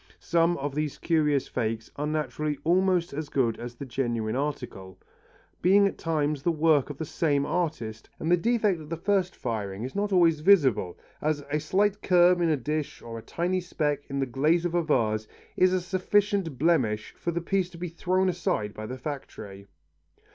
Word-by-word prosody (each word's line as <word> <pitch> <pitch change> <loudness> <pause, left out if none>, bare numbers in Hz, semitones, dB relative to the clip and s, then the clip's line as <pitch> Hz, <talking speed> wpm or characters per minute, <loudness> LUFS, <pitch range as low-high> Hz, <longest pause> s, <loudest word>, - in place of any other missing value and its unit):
Some 170 0 +1
of 140 0 -3
these 150 -1 -2
curious 150 -4 +1
fakes 115 -2 -3
are 145 +1 -2
naturally 150 -1 -2
almost 180 0 +2
as 150 +1 -4
good 120 -5 0
as 120 0 -7
the 140 - -7
genuine 120 -4 -2
article, 125 -10 -4 0.6
being 200 +3 +5
at 200 - -2
times 150 -3 0
the 170 - +1
work 155 -3 +3
of 145 - -7
the 160 - -4
same 145 -2 0
artist 150 -11 -3
and 160 - -1
the - - +7
defect 210 -2 +1
of 150 - -11
the 165 - -3
first 190 +1 0
firing 105 -4 -4
is 130 - -5
not 205 +1 -1
always 170 -4 +4
visible 135 - +3 0.2
as 150 -1 0
a 150 - +1
slight 200 +6 +1
curve 180 -1 +4
in 170 - +3
a 155 - +2
dish, 150 +3 -3
or 115 -1 -7
a - - -10
tiny 180 +8 -1
speck 150 -5 -2
in 140 - -3
the 135 - +1
glaze 150 +7 +1
of 175 - -1
a 175 - +3
vase, 110 -9 0 0.3
is 185 0 +4
a 185 - +2
sufficient 190 - 0
blemish 130 -9 +1
for - - -4
the 170 0 -1
piece 185 +1 0
to 175 - -12
be 180 +1 -4
thrown 185 +3 0
aside 160 - -1
by 110 0 -7
the 130 - -6
factory. 110 -8 -7
155 Hz, 190 wpm, -27 LUFS, 130-175 Hz, 0.6 s, the